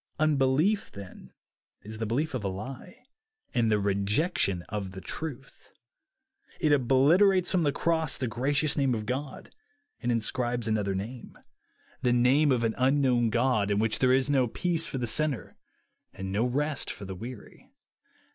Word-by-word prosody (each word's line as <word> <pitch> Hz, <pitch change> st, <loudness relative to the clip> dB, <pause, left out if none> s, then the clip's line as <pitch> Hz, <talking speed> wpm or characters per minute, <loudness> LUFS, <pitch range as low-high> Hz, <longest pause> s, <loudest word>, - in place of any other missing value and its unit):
Un 155 Hz, 0 st, +2 dB
belief, 145 Hz, +10 st, +1 dB
then, 95 Hz, -9 st, -11 dB, 0.5 s
is 110 Hz, +1 st, -7 dB
the 115 Hz, -, -2 dB
belief 145 Hz, +7 st, -1 dB
of 125 Hz, -5 st, -3 dB
a -, -, -1 dB
lie 130 Hz, -, -8 dB, 0.5 s
and 115 Hz, -4 st, +2 dB
the 105 Hz, -, +3 dB
rejection 100 Hz, -, 0 dB
of 100 Hz, -2 st, -5 dB
the 95 Hz, -, -7 dB
truth. 135 Hz, +3 st, -7 dB, 0.9 s
It 155 Hz, -, +2 dB
obliterates 155 Hz, -, +4 dB
from 185 Hz, -, +2 dB
the 145 Hz, -3 st, +2 dB
cross 160 Hz, -1 st, 0 dB
the 130 Hz, -, -2 dB
gracious 140 Hz, +6 st, +1 dB
name 135 Hz, -4 st, +1 dB
of 110 Hz, -1 st, -4 dB
God, 130 Hz, +4 st, -5 dB, 0.5 s
and 120 Hz, -2 st, 0 dB
inscribes 120 Hz, +1 st, -1 dB
another 105 Hz, -3 st, 0 dB
name, 115 Hz, +6 st, -7 dB, 0.6 s
the 125 Hz, -, +2 dB
name 130 Hz, +5 st, +4 dB
of 125 Hz, -2 st, +1 dB
an 115 Hz, -, +2 dB
D -, -, -12 dB
38 -, -, -12 dB
aOD*3 -, -, -5 dB
CIIARAOTER 130 Hz, -, +5 dB
unknown 125 Hz, -5 st, +2 dB
god, 115 Hz, -3 st, +1 dB
in 100 Hz, -, +1 dB
wliicli 110 Hz, +1 st, 0 dB
there 130 Hz, -1 st, +4 dB
is 135 Hz, +2 st, +2 dB
no 130 Hz, -3 st, +3 dB
peace 165 Hz, +6 st, -1 dB
for -, -, -5 dB
the 125 Hz, -, -2 dB
sinner 140 Hz, +2 st, 0 dB, 0.6 s
and 95 Hz, 0 st, -6 dB
no 105 Hz, +5 st, +1 dB
rest 145 Hz, +3 st, -1 dB
for 100 Hz, -, -6 dB
the 95 Hz, -, -6 dB
weary. 115 Hz, +4 st, -10 dB
125 Hz, 175 wpm, -28 LUFS, 110-145 Hz, 0.9 s, CIIARAOTER